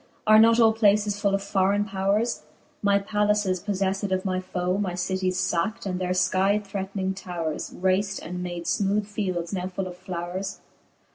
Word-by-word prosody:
Are 215 0 +7
not 230 +1 +6
all 225 -1 +6
places 205 -1 +2
full 200 -2 +2
of 195 - -3
forraine 200 +1 +1
powres? 200 +4 0 0.4
My 200 -1 +4
pallaces 210 -2 +1
poflelTed 195 0 -1
of 185 +1 0
my 185 -1 0
foe, 185 0 -2
My 185 -4 -1
cities 185 0 -1
facktj 185 +4 -1
and 185 -1 -2
their 180 - -1
fkie 195 +3 +2
threating 195 -1 -3
tovVres 175 -5 -4
Raced, 190 +2 +1
and 180 +1 -6
made 175 -1 -4
finooth 205 +1 +1
fields 185 -4 -3
now 185 -1 -2
full 190 +1 -4
of 180 - -8
flowres? 180 +2 -4
195 Hz, 165 wpm, -25 LUFS, 185-205 Hz, 0.4 s, Are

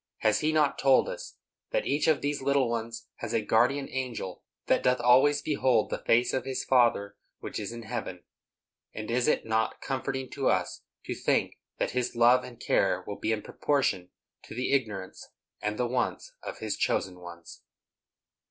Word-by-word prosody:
Has 110 -1 +3
He 155 0 +1
not 150 -2 +2
told 135 -1 +4
us - - -7 0.3
that - - 0
each 145 - +1
of 155 -3 +3
these 145 0 -1
little 140 -1 +2
ones 115 0 -4
has - - -5
a 115 - +2
guardian 130 +6 +2
angel 125 -8 -4 0.2
that - - +2
doth 125 0 +2
always 125 +4 +5
behold 130 -6 +2
the - - -2
face 120 +2 +3
of 130 - 0
his 135 -1 -3
Father 115 -6 +2 0.2
which - - -5
is 105 0 -4
in 115 0 -8
heaven? 110 -6 -5 0.7
And 110 +1 -5
is 120 +1 +1
it - - +2
not 110 0 0
comforting 130 -1 -3
to 135 - -1
us 90 -1 0 0.2
to - - -3
think - - 0 0.2
that - - -1
His 125 -1 -2
love 120 +2 +5
and 120 -2 -11
care - - +1
will 100 - -6
be - - -1
in 110 -1 -1
proportion 130 -11 0 0.4
to - - -10
the 125 +2 -1
ignorance 105 -8 -2 0.3
and 105 0 -2
the 125 - +1
wants 125 - -2
of - - -7
His 110 -2 -3
chosen 90 -1 -1
ones? 85 -1 -11
125 Hz, 180 wpm, -28 LUFS, 110-135 Hz, 0.7 s, always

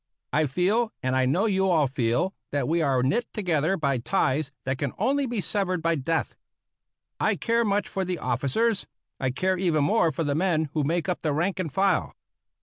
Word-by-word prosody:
I 155 0 +3
feel, 200 - +1
and 130 0 0
I 130 -1 +2
know 180 +11 +2
you 190 -3 +2
all 160 -5 +4
feel, 130 +7 0 0.2
that 145 - -1
we 165 +2 +1
are 135 -4 +2
knit 230 - +1
together 175 -2 0
by 140 -4 0
ties 135 +4 0
that 130 0 -2
can 140 -4 -2
only 280 0 +1
be 235 -4 -2
severed 185 -1 -1
by 165 0 +2
death. 160 +2 -1 0.9
I - - +2
care 235 0 +1
much 205 -1 0
for 190 - -2
the 180 -1 -2
officers; 140 - 0 0.3
I 130 - 0
care 185 +8 0
even 165 -5 +2
more 170 0 +3
for 160 +3 -2
the 145 -2 0
men 160 -2 +1
who 155 - 0
make 165 +5 0
up 180 - -2
the 155 -2 0
rank 175 +6 0
and 165 -5 -2
file. 190 +2 +1
165 Hz, 200 wpm, -26 LUFS, 140-190 Hz, 0.9 s, all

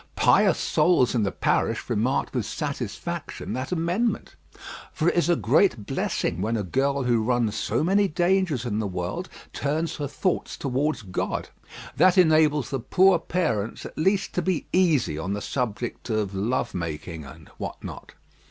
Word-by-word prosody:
Pious - - +4
souls 155 -5 +3
in 120 - +1
the 100 - 0
parish - - 0
remarked 125 +6 0
with - - -1
satisfaction - - -4
that 130 +4 -4
amendment. 180 +7 -1 0.6
For 165 -1 +1
it - - -2
is 175 -1 +2
a 175 - +5
great 155 - +2
blessing 90 - -1
when 115 +3 0
a 105 - -2
girl 135 +7 0
who 120 -2 +2
runs 120 -2 +1
so - - -1
many 200 +4 +3
dangers 175 -6 +1
in 105 -3 -1
the 110 - -1
world 90 -1 -4 0.2
turns 155 +4 -1
her 145 - -2
thoughts 180 +6 -2
towards 140 0 -1
God. 95 -2 -3 0.5
That 185 0 +5
enables 155 -5 +4
the 135 - -1
poor 180 +9 +4
parents 115 - -2
at - - -9
least 190 +5 +1
to 180 - 0
be 185 -3 -1
easy 160 - +2
on 95 +4 -2
the 105 - -2
subject 120 0 -3
of 105 -3 -1
love 110 +7 -1
making 80 -1 -5
and 75 +3 -13
what - - -6
not. - - -9
135 Hz, 165 wpm, -25 LUFS, 105-175 Hz, 0.6 s, a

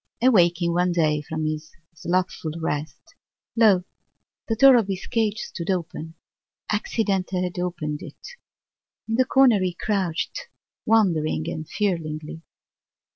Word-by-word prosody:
Awaking 175 -8 +4
one 180 +1 +2
day 155 -3 +1
from 155 +1 -4
his 155 0 -4 0.2
slothful 175 -2 -2
rest, 155 -1 -4 0.4
lo! 210 -6 +5 0.6
the 225 - 0
door 270 +3 +7
of 225 -5 +3
his 195 -1 -4
cage 220 -3 0
stood 170 -4 -6
open: 165 -3 -3 0.6
accident 210 -3 0
had 180 -1 -2
opened 155 -4 -3
it. - - -11 0.8
In 225 - -3
the 255 +3 +3
corner 255 -6 +5
he 180 -2 -1
crouched, 195 - -2 0.4
wondering 170 -8 +2
and 160 -1 -5
fearingly. 160 -6 -3
180 Hz, 125 wpm, -24 LUFS, 160-210 Hz, 0.8 s, door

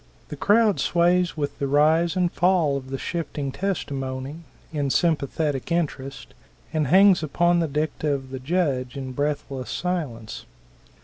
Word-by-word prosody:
The - - -5
crowd 210 +5 +3
sways 175 0 +2
with 145 -1 -3
the 140 - 0
rise 155 +5 +3
and 180 -2 +1
fall 175 -5 +2
of 130 -1 -5
the 135 - -3
shifting 145 -3 -4
testimony, 135 -6 -3 0.4
in 145 -2 -1
sympathetic 150 -2 0
interest, 140 -5 -3 0.4
and 155 -3 +1
hangs 190 +3 +6
upon 175 +3 +2
the 165 - +1
dicta 150 +1 -1
of 135 -2 -3
the 130 - -5
judge 135 -4 -1
in 130 -1 -5
breathless 140 -1 -3
silence. 150 -12 -4
150 Hz, 140 wpm, -24 LUFS, 135-175 Hz, 0.4 s, hangs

